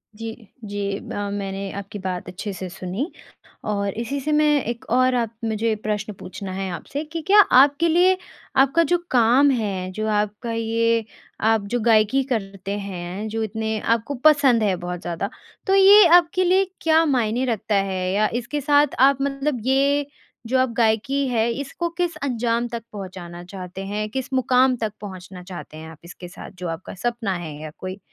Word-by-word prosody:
जी, 225 Hz, -1 st, -9 dB
जी 200 Hz, -1 st, -3 dB
ब -, -, -9 dB, 0.2 s
मैंने 195 Hz, -1 st, -4 dB
आपकी 200 Hz, +1 st, -7 dB
बात 185 Hz, -2 st, -4 dB
अच्छे 185 Hz, +3 st, -5 dB
से 185 Hz, -1 st, -6 dB
सुनी, 190 Hz, -, -4 dB, 0.5 s
और 200 Hz, -2 st, -1 dB
इसी 235 Hz, +5 st, -3 dB
से 295 Hz, +3 st, -2 dB
मैं 300 Hz, 0 st, +4 dB, 0.2 s
एक 235 Hz, 0 st, -5 dB
और 255 Hz, +1 st, +3 dB
आप 230 Hz, -2 st, -1 dB
मुझे 220 Hz, 0 st, 0 dB
प्रश्न 210 Hz, 0 st, -2 dB
पूछना 190 Hz, +1 st, -7 dB
है 190 Hz, 0 st, -3 dB
आपसे 280 Hz, -, -5 dB
कि 320 Hz, +1 st, -6 dB
क्या 410 Hz, +2 st, +7 dB, 0.2 s
आपके 290 Hz, +4 st, +3 dB
लिए 360 Hz, +3 st, +4 dB, 0.5 s
आपका 295 Hz, +5 st, +2 dB
जो 350 Hz, -, +5 dB
काम 250 Hz, +4 st, +5 dB
है 195 Hz, -7 st, -2 dB
जो 215 Hz, +3 st, -3 dB
आपका 210 Hz, +2 st, -1 dB
ये 230 Hz, 0 st, +1 dB, 0.4 s
आप 220 Hz, -1 st, +3 dB
जो 245 Hz, +4 st, -1 dB
गायकी 220 Hz, +3 st, +3 dB
करते 195 Hz, -3 st, -3 dB
हैं 190 Hz, +1 st, -5 dB
जो 225 Hz, +1 st, -2 dB
इतने 220 Hz, 0 st, -2 dB
आपको 230 Hz, +6 st, 0 dB
पसंद 280 Hz, -7 st, +5 dB
है 200 Hz, -3 st, +2 dB
बहुत 175 Hz, 0 st, -5 dB
ज़्यादा 175 Hz, +3 st, -3 dB, 0.4 s
तो 385 Hz, -, +4 dB
ये 395 Hz, +1 st, +8 dB
आपके 355 Hz, +1 st, +3 dB
लिए 375 Hz, +2 st, +3 dB, 0.2 s
क्या 320 Hz, 0 st, +4 dB
मायने 250 Hz, -3 st, +1 dB
रखता 220 Hz, -3 st, -1 dB
है? 190 Hz, -2 st, 0 dB
या 210 Hz, +2 st, +3 dB
इसके 245 Hz, +5 st, -3 dB
साथ 290 Hz, 0 st, +3 dB
आप 275 Hz, +1 st, +6 dB
मतलब 275 Hz, -1 st, -1 dB
ये 280 Hz, +2 st, +2 dB, 0.4 s
जो 260 Hz, +3 st, +1 dB
आप 260 Hz, 0 st, +2 dB
गायकी 235 Hz, +5 st, +1 dB
हैं 230 Hz, -2 st, +1 dB
इसको 280 Hz, +7 st, -3 dB
किस 350 Hz, -1 st, 0 dB
अंजाम 240 Hz, -2 st, 0 dB
तक 235 Hz, -2 st, -6 dB
पहुँचाना 180 Hz, -3 st, -8 dB
चाहते 185 Hz, +1 st, -8 dB
हैं? 210 Hz, +2 st, -3 dB
किस 265 Hz, +3 st, -4 dB
मुक़ाम 255 Hz, 0 st, +3 dB
तक 215 Hz, -2 st, -2 dB
पहुँचना 185 Hz, -2 st, -9 dB
चाहते 175 Hz, -4 st, -9 dB
हैं 160 Hz, +1 st, -9 dB
आप 160 Hz, -, -13 dB
इसके 175 Hz, +1 st, -10 dB
साथ 175 Hz, -, -10 dB
जो 180 Hz, -, -4 dB
आपका 165 Hz, +2 st, -6 dB
सपना 235 Hz, -1 st, -2 dB
है 160 Hz, -4 st, -7 dB
या 155 Hz, -1 st, -7 dB
कोई 185 Hz, +1 st, -6 dB
225 Hz, 180 wpm, -22 LUFS, 195-265 Hz, 0.5 s, ये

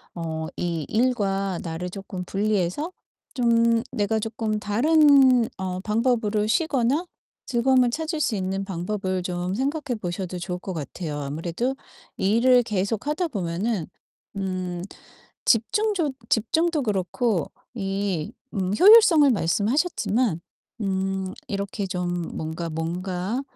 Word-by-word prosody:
어 160 Hz, -2 st, -4 dB
이 165 Hz, -4 st, -2 dB
일과 195 Hz, -6 st, 0 dB
나를 170 Hz, +2 st, -4 dB
쪼끔 190 Hz, -1 st, -6 dB
분리해서 205 Hz, -, -1 dB, 0.4 s
좀 230 Hz, -2 st, +3 dB
내가 220 Hz, -2 st, 0 dB
쪼끔 220 Hz, -1 st, -2 dB
다른 260 Hz, +2 st, +5 dB
어 185 Hz, -1 st, -3 dB
방법으로 220 Hz, -1 st, +1 dB
쉬거나 280 Hz, +2 st, +1 dB, 0.4 s
즐거움을 250 Hz, 0 st, +3 dB
찾을 315 Hz, +5 st, -3 dB
수 230 Hz, -, +1 dB
있는 190 Hz, 0 st, -2 dB
방법을 185 Hz, 0 st, -3 dB
좀 180 Hz, +1 st, -2 dB
생각해 275 Hz, 0 st, -1 dB
보셔도 180 Hz, 0 st, -4 dB
좋을 180 Hz, 0 st, -4 dB
것 190 Hz, +1 st, -5 dB
같아요. 155 Hz, -1 st, -5 dB
아무래도 165 Hz, -, -2 dB, 0.4 s
일을 240 Hz, +5 st, +4 dB
계속하다 225 Hz, -, -1 dB
보면은 190 Hz, -, -2 dB, 0.5 s
음 185 Hz, -2 st, -3 dB, 0.6 s
집중조 335 Hz, -, +2 dB, 0.2 s
집중도 315 Hz, +7 st, +1 dB
그렇고 205 Hz, -, 0 dB, 0.3 s
이 195 Hz, -4 st, -2 dB, 0.2 s
음 190 Hz, -2 st, 0 dB
효율성을 380 Hz, -7 st, +8 dB
말씀하셨지만 220 Hz, -, +1 dB, 0.4 s
음 190 Hz, -1 st, -1 dB
이렇게 200 Hz, 0 st, -3 dB
좀 175 Hz, -1 st, -3 dB
뭔가 160 Hz, +2 st, -4 dB
뭔가 180 Hz, +7 st, -3 dB
205 Hz, 245 characters per minute, -24 LUFS, 180-245 Hz, 0.6 s, 효율성을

